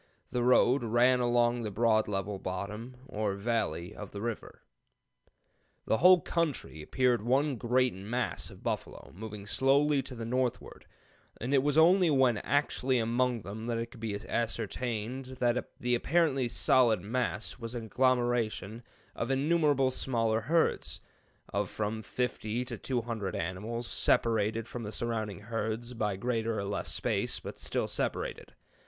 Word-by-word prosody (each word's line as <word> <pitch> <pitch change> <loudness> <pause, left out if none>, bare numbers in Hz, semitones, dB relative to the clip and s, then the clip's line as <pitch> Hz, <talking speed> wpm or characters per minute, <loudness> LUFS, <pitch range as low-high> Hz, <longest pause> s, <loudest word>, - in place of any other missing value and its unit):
The 125 - 0
road 125 +1 +4
ran 120 +3 +4
along 120 0 +2
the 110 - -3
broad 110 +1 +2
level 100 0 -2
'bottom,' 105 +7 -5
or 105 -6 -2
valley, 100 -6 -2
of 105 -2 -9
the 100 - -5
river. 115 -2 -5 1.2
"The 110 - +2
whole 180 0 +7
country 155 - -2
appeared 125 +7 +1
one 135 +5 +2
great 125 +2 +2
mass 110 +6 -3
of - - -14
buffalo, - - -4
moving 105 +1 -7
slowly 140 +5 +3
to 130 0 -7
the 115 -1 -5
northward; 125 +1 -2 0.5
and 125 +5 -2
it 135 - +5
was 145 +2 +1
only 175 +2 +6
when 130 -6 +3
actually 135 -2 +1
among 120 0 +1
them 110 +4 -6
that 120 -1 -1
it 115 0 -4
could - - -13
be 110 -2 -3
ascertained 115 +2 -2
that 120 0 0
the 125 0 0
apparently 140 -1 +2
solid 120 -3 +3
mass 110 +1 -2
was 115 0 -6
an 115 -2 -4
agglomeration 120 -3 +1 0.3
of 115 - -3
innumerable 140 -1 +2
small 115 -3 0
herds, 140 +10 +1 0.5
of 100 -2 0
from 110 +1 -3
fifty 125 0 -2
to 125 -1 -5
two 125 +3 -2
hundred 110 -5 -3
animals, 105 +8 -3
separated 110 -1 +1
from 120 - -6
the 105 -2 -5
surrounding 110 -4 -3
herds 115 +2 -3
by 105 -4 -1
greater 115 +1 -1
or 100 - -2
less 100 - -2
space, - - 0
but - - -8
still - - -1
separated. - - -3
120 Hz, 150 wpm, -30 LUFS, 110-130 Hz, 1.2 s, whole